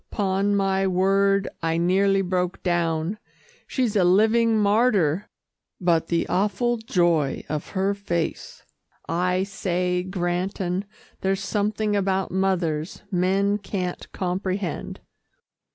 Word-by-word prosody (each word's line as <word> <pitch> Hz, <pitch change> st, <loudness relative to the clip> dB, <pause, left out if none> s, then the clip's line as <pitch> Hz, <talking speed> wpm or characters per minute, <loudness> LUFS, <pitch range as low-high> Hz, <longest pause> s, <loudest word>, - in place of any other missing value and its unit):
'Pon 200 Hz, 0 st, 0 dB
my 195 Hz, -1 st, +1 dB
word 195 Hz, +1 st, +2 dB
I 165 Hz, 0 st, 0 dB
nearly 195 Hz, +3 st, +3 dB
broke 180 Hz, 0 st, -2 dB
down 170 Hz, +2 st, 0 dB, 0.5 s
she's 245 Hz, -6 st, -1 dB
a 195 Hz, -, +4 dB
living 220 Hz, +5 st, +4 dB
martyr, 205 Hz, -5 st, +2 dB, 0.5 s
but 170 Hz, -3 st, +2 dB
the 170 Hz, -1 st, 0 dB
awful 210 Hz, +6 st, +1 dB
joy 175 Hz, -, +1 dB
of 150 Hz, 0 st, -3 dB
her 195 Hz, +1 st, +2 dB
face. 175 Hz, -5 st, -4 dB, 0.4 s
I 180 Hz, +3 st, +1 dB
say, 180 Hz, -2 st, -1 dB
Granton 180 Hz, +1 st, -2 dB, 0.3 s
there's 195 Hz, 0 st, -1 dB
something 210 Hz, +1 st, 0 dB
about 195 Hz, -1 st, 0 dB
mothers, 180 Hz, -4 st, -1 dB
men 195 Hz, +3 st, +1 dB
can't 185 Hz, -3 st, -4 dB
comprehend." 185 Hz, -1 st, -3 dB
190 Hz, 105 wpm, -24 LUFS, 175-200 Hz, 0.5 s, a